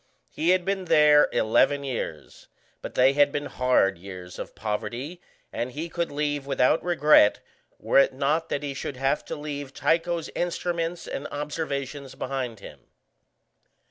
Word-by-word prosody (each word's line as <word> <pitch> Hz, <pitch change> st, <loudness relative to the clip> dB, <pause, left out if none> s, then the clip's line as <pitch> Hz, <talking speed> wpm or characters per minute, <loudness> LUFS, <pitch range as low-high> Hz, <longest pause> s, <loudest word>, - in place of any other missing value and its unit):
He 165 Hz, -, -1 dB
had 185 Hz, -1 st, +3 dB
been 195 Hz, -1 st, -1 dB
there 150 Hz, -2 st, +5 dB
eleven 140 Hz, +6 st, +2 dB
years, 115 Hz, -, -6 dB, 0.3 s
but -, -, -8 dB
they 130 Hz, +2 st, +5 dB
had 145 Hz, 0 st, +4 dB
been 145 Hz, 0 st, -3 dB
hard 95 Hz, -8 st, +1 dB
years 90 Hz, -1 st, -9 dB
of -, -, -7 dB
poverty, 120 Hz, +10 st, -4 dB, 0.3 s
and 120 Hz, +2 st, -3 dB
he 160 Hz, +3 st, -5 dB
could 170 Hz, 0 st, -2 dB
leave 145 Hz, -1 st, -2 dB
without 135 Hz, +2 st, +2 dB
regret 150 Hz, -10 st, +5 dB, 0.4 s
were -, -, +3 dB
it 140 Hz, -, +4 dB
not 150 Hz, +5 st, 0 dB
that 145 Hz, -, -2 dB
he 140 Hz, -1 st, -3 dB
should 135 Hz, -1 st, -5 dB
have 135 Hz, +3 st, 0 dB
to -, -, -5 dB
leave 145 Hz, -2 st, -6 dB
Tycho's 170 Hz, 0 st, 0 dB
instruments 175 Hz, -1 st, -2 dB
and 140 Hz, -, -5 dB
observations 145 Hz, -2 st, -4 dB
behind 125 Hz, -5 st, -4 dB
him. -, -, -11 dB
145 Hz, 150 wpm, -26 LUFS, 130-160 Hz, 0.4 s, there